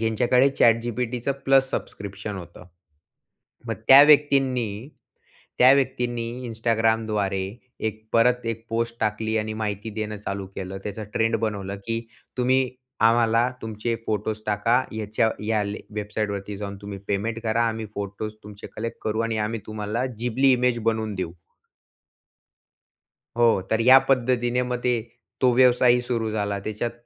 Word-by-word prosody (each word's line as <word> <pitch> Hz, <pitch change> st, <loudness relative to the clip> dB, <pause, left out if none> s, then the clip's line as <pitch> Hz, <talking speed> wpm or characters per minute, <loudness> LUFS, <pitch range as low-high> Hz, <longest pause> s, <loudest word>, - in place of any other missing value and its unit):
ज्यांच्याकडे 120 Hz, +4 st, +3 dB
ChatGPTच 120 Hz, +2 st, +1 dB, 0.2 s
plus 135 Hz, -1 st, +4 dB
subscription 100 Hz, -3 st, -5 dB
होतं. 90 Hz, 0 st, -10 dB, 1.0 s
मग 115 Hz, -, -2 dB
त्या 135 Hz, +1 st, +11 dB
व्यक्तींनी 135 Hz, -5 st, +4 dB, 0.9 s
त्या 130 Hz, +1 st, +8 dB
व्यक्तींनी 125 Hz, -3 st, -1 dB, 0.2 s
Instagramद्वारे 110 Hz, -3 st, 0 dB, 0.5 s
एक 110 Hz, 0 st, -9 dB
परत 125 Hz, +1 st, +3 dB
एक 115 Hz, 0 st, -3 dB
पोस्ट 115 Hz, +1 st, -2 dB
टाकली 110 Hz, +1 st, -1 dB
आणि 110 Hz, 0 st, -2 dB
माहिती 105 Hz, 0 st, -3 dB
देणं 105 Hz, 0 st, -4 dB
चालू 100 Hz, -1 st, -5 dB
केलं. 95 Hz, 0 st, -5 dB
त्याचा 105 Hz, +1 st, -5 dB
ट्रेंड 115 Hz, +1 st, +2 dB
बनवलं 100 Hz, -3 st, -3 dB
की 115 Hz, 0 st, -1 dB, 0.4 s
तुम्ही 130 Hz, +1 st, +3 dB, 0.5 s
आम्हाला 115 Hz, +1 st, +3 dB
तुमचे 110 Hz, +1 st, -3 dB
फोटोज 110 Hz, 0 st, -2 dB
टाका, 105 Hz, +3 st, +2 dB, 0.2 s
ह्याच्या 110 Hz, +1 st, 0 dB, 0.2 s
या 110 Hz, -1 st, +1 dB, 0.3 s
वेबसाईटवरती 105 Hz, -1 st, -4 dB
जाऊन 100 Hz, -1 st, -5 dB
तुम्ही 100 Hz, -1 st, -7 dB
पेमेंट 110 Hz, +3 st, -1 dB
करा, 115 Hz, +1 st, +1 dB
आम्ही 110 Hz, -1 st, -4 dB
फोटोज 100 Hz, +1 st, -5 dB
तुमचे 105 Hz, -1 st, -10 dB
कलेक्ट 115 Hz, +1 st, -4 dB
करू 110 Hz, +1 st, -1 dB
आणि 115 Hz, -1 st, -1 dB
आम्ही 115 Hz, 0 st, -4 dB
तुम्हाला 110 Hz, +3 st, -3 dB
जिबली 125 Hz, +3 st, +2 dB
इमेज 125 Hz, -1 st, +2 dB
बनवून 110 Hz, -2 st, -1 dB
देऊ. 90 Hz, -3 st, -3 dB, 2.1 s
हो, 115 Hz, -5 st, +4 dB
तर 110 Hz, +1 st, +2 dB
या 130 Hz, +3 st, +8 dB
पद्धतीने 125 Hz, -1 st, +2 dB
मग 125 Hz, 0 st, -2 dB
ते 125 Hz, -1 st, +2 dB, 0.5 s
तो 130 Hz, -, +5 dB
व्यवसायही 125 Hz, 0 st, +5 dB
सुरू 115 Hz, -2 st, -2 dB
झाला. 100 Hz, -2 st, -2 dB
त्याच्यात 110 Hz, +4 st, -3 dB
115 Hz, 135 wpm, -24 LUFS, 105-120 Hz, 2.1 s, त्या